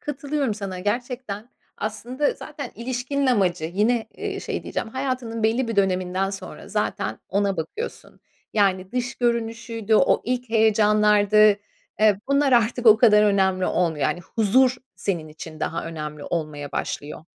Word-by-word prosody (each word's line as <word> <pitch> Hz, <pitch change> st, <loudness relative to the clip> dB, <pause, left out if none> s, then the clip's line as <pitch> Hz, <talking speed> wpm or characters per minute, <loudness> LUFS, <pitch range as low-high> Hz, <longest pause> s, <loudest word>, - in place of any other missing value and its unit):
Katılıyorum 280 Hz, -3 st, -2 dB
sana 195 Hz, -3 st, -5 dB
gerçekten. 235 Hz, +1 st, -3 dB, 0.3 s
Aslında 245 Hz, +7 st, -2 dB
zaten 285 Hz, -4 st, -8 dB
ilişkinin 255 Hz, +4 st, -2 dB
amacı 185 Hz, -9 st, +2 dB
yine, 215 Hz, +7 st, +1 dB
eee, 400 Hz, -2 st, -4 dB
şey -, -, -4 dB
diyeceğim, -, -, -4 dB
hayatının 255 Hz, -2 st, -3 dB
belli 230 Hz, +3 st, +1 dB
bir 230 Hz, -, -3 dB
döneminden 190 Hz, 0 st, +1 dB
sonra 195 Hz, -, -8 dB
zaten -, -, -2 dB
ona 200 Hz, 0 st, 0 dB
bakıyorsun. 290 Hz, -, -6 dB, 0.3 s
Yani 190 Hz, -2 st, +1 dB
dış 245 Hz, 0 st, -2 dB
görünüşüydü, 230 Hz, -2 st, -1 dB
o -, -, +4 dB
ilk 250 Hz, -1 st, -2 dB
heyecanlardı, 210 Hz, -1 st, +4 dB, 0.6 s
eee, 210 Hz, -2 st, +4 dB
bunlar 280 Hz, -1 st, +3 dB
artık 240 Hz, +1 st, +2 dB
o 215 Hz, -1 st, +9 dB
kadar 215 Hz, -2 st, +6 dB
önemli 190 Hz, -3 st, +2 dB
olmuyor. 165 Hz, -4 st, 0 dB
Yani 175 Hz, -, 0 dB
huzur 245 Hz, +7 st, +2 dB, 0.2 s
senin 170 Hz, -6 st, -3 dB
için 155 Hz, +1 st, -10 dB
daha 165 Hz, -, -2 dB
önemli 150 Hz, -2 st, -6 dB
olmaya 150 Hz, -3 st, -4 dB
başlıyor. 150 Hz, +1 st, -4 dB
215 Hz, 140 wpm, -23 LUFS, 190-245 Hz, 0.6 s, o